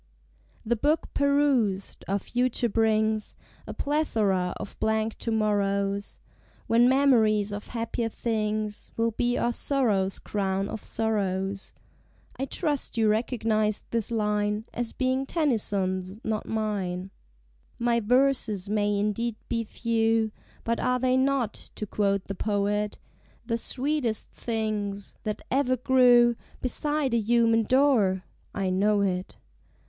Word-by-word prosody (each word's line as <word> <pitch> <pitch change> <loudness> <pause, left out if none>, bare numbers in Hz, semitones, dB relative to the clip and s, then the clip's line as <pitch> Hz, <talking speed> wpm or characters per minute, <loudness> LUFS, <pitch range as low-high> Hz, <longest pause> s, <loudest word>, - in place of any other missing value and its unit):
The 235 +2 +2
Book 295 +7 0
perused, 280 -9 +1
our 195 - +1
Future 245 +3 0
brings 220 -1 +1 0.3
A - - -5
plethora 215 -12 0
of - - -8
blank 220 0 0
to - - -3
morrows, 200 -2 0 0.5
When 235 +2 +4
memories 225 -7 +3
of 205 0 -6
Happier 230 -1 -2
Things 215 -2 -2
Will 230 0 +2
be 240 +2 0
our 240 - +1
Sorrow's 215 -9 +1
Crown 195 -1 -2
of 220 - -6
Sorrows. 195 -3 -1 0.6
(I 270 - -2
trust 290 -3 -1
you 220 -1 +3
recognize 215 -1 0
this 230 -2 0
line 210 -1 0
As 240 -1 -3
being 260 +1 0
Tennyson's, 200 - -1
not 215 -1 -2
mine.) 195 -4 -2 0.7
My 235 0 +2
verses 235 -4 +2
may 205 0 +1
indeed 210 +3 -1
be 230 -1 0
few, 225 -1 0 0.3
But 230 0 -1
are 250 0 +1
they 255 0 +2
not, 260 -4 +1 0.2
to 215 - -4
quote 200 -1 0
the 195 - -4
poet, 205 +1 -1 0.5
"The 230 -1 0
sweetest 255 -1 -2
things 210 -3 -3
that 210 -1 -3
ever 255 -1 +2
grew 245 -1 +5 0.2
Beside 295 +1 0
a 235 - +3
human 230 +1 +3
door"? 230 -8 +3 0.3
I 195 -2 0
know 205 +2 +2
it. 185 -2 -2
220 Hz, 125 wpm, -27 LUFS, 205-245 Hz, 0.7 s, grew